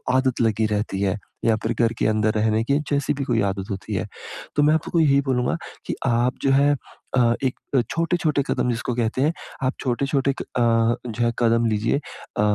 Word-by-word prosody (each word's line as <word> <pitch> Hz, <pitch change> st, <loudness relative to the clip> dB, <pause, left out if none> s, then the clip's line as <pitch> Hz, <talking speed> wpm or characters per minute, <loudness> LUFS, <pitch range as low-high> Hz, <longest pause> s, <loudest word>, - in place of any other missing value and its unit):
आदत 130 Hz, -2 st, +1 dB
लगी 110 Hz, -1 st, +2 dB
रहती 105 Hz, -2 st, -1 dB
है 100 Hz, +1 st, +1 dB, 0.3 s
या 115 Hz, -1 st, +4 dB
फिर -, -, 0 dB
घर 115 Hz, -1 st, +3 dB
के -, -, +1 dB
अंदर 110 Hz, 0 st, +2 dB
रहने 110 Hz, +1 st, +1 dB
की 140 Hz, +4 st, +2 dB
जैसी 140 Hz, 0 st, +1 dB
भी 140 Hz, -1 st, -3 dB
कोई 120 Hz, -3 st, +1 dB
आदत 95 Hz, +1 st, -5 dB
होती 95 Hz, -, -5 dB
है। -, -, -1 dB, 0.5 s
तो 145 Hz, -, +3 dB
मैं 150 Hz, +1 st, +5 dB
आपको 160 Hz, -, -1 dB
को 170 Hz, -, +2 dB
यही 140 Hz, -3 st, +4 dB
बोलूँगा 125 Hz, -3 st, 0 dB, 0.3 s
कि -, -, -3 dB
आप 120 Hz, +2 st, +2 dB
जो 135 Hz, -, +3 dB
है 140 Hz, +2 st, +4 dB, 0.4 s
अ, 120 Hz, -2 st, +4 dB
एक 130 Hz, -1 st, -1 dB, 0.3 s
छोटे-छोटे 165 Hz, -3 st, +1 dB
कदम -, -, 0 dB
जिसको 120 Hz, +1 st, -2 dB
कहते 120 Hz, +1 st, 0 dB
हैं, 155 Hz, -, +2 dB, 0.3 s
आप 130 Hz, +1 st, +1 dB
छोटे-छोटे 135 Hz, +2 st, 0 dB
क -, -, -3 dB
अ, 120 Hz, 0 st, +2 dB
जो 120 Hz, +2 st, -1 dB
है 115 Hz, -, +2 dB
कदम 115 Hz, 0 st, +3 dB
लीजिए। 110 Hz, +4 st, +1 dB
अ, 140 Hz, -, -7 dB
120 Hz, 205 wpm, -23 LUFS, 110-140 Hz, 0.5 s, मैं